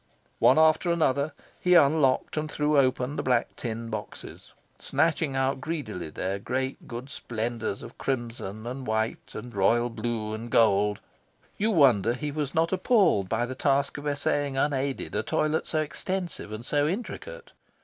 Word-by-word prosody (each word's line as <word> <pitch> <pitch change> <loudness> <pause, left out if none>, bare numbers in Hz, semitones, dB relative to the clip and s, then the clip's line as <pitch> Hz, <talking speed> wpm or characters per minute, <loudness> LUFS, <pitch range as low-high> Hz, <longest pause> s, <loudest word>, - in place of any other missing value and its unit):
One - - +6
after 160 +2 +4
another, 150 -3 +1 0.3
he 180 0 +4
unlocked 140 -4 +4
and 155 0 -2
threw 150 0 +1
open 130 0 +2
the - - 0
black 125 -2 +1
tin 115 -1 -5
boxes, 105 -1 -8 0.3
snatching 160 -4 0
out 135 0 0
greedily 125 - -4
their 95 +5 -3
great 130 +5 -3
good 120 +1 -6
splendours 115 -5 -4
of - - -11
crimson 115 -5 -3
and 130 +2 -5
white 110 +1 -2
and 120 +3 -7
royal 115 +5 +2
blue 110 -1 -3
and 115 +2 -6
gold. 105 -3 +3 0.5
You 215 +2 +1
wonder 125 - +4
he 150 +3 -4
was 145 -2 -3
not 165 +3 +2
appalled 185 - +3
by 115 +2 +1
the 130 - -5
task 140 +1 +1
of 145 - -6
essaying 145 -1 0
unaided 135 -1 -1
a 105 - +1
toilet 155 +7 0
so 155 - +1
extensive 170 - -4
and 110 +2 -6
so 145 +2 +2
intricate? 475 - -5
130 Hz, 160 wpm, -27 LUFS, 115-155 Hz, 0.5 s, One